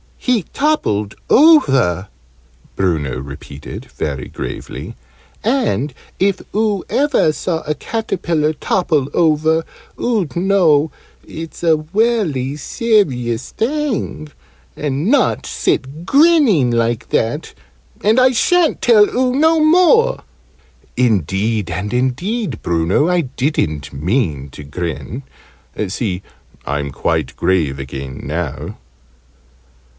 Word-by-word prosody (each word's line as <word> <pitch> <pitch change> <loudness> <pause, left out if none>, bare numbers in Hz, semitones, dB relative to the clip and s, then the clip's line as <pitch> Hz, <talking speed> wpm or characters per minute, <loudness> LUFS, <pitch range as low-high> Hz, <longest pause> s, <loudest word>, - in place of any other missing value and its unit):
"He 245 -6 +1
toppled 105 - 0 0.2
over," 135 - +5 0.7
Bruno 75 -9 -1
repeated, 70 +1 -9
very 70 -4 -5
gravely, - - -7 0.5
"and 210 - 0 0.3
if 195 0 +1
oo 210 -3 +1
ever 270 - +2
saw 165 0 -2
a 150 0 -3
caterpillar 165 -6 -1
topple 155 -4 0
over, 160 0 +2 0.4
oo'd 215 - -1
know 170 -5 +3 0.4
it's 165 +1 -8
a 165 -2 +4
welly 155 - 0
serious 140 - 0
thing, 250 - -2 0.5
and 145 +3 -2
not 285 +5 +2
sit 145 +6 -2
grinning 275 - +4
like 115 -1 0
that 120 +8 -1 0.5
and 220 +4 +4
I 255 0 +5
sha'n't 335 +6 +2
tell 220 -4 +6
oo 255 0 0
no 320 +3 +4
more!" 365 +10 +4 0.7
"Indeed 105 -2 +1
and 90 +6 -3
indeed, 130 - -1
Bruno, 85 - +1
I 180 -1 +2
didn't 130 - -2
mean 75 - -1
to 75 - -10
grin. 85 - -5 0.7
See, 95 -3 -3 0.4
I'm 70 0 -2
quite - - -1
grave 80 -8 +1
again 65 -1 -7
now." 75 -1 -4
150 Hz, 100 wpm, -17 LUFS, -, 0.7 s, tell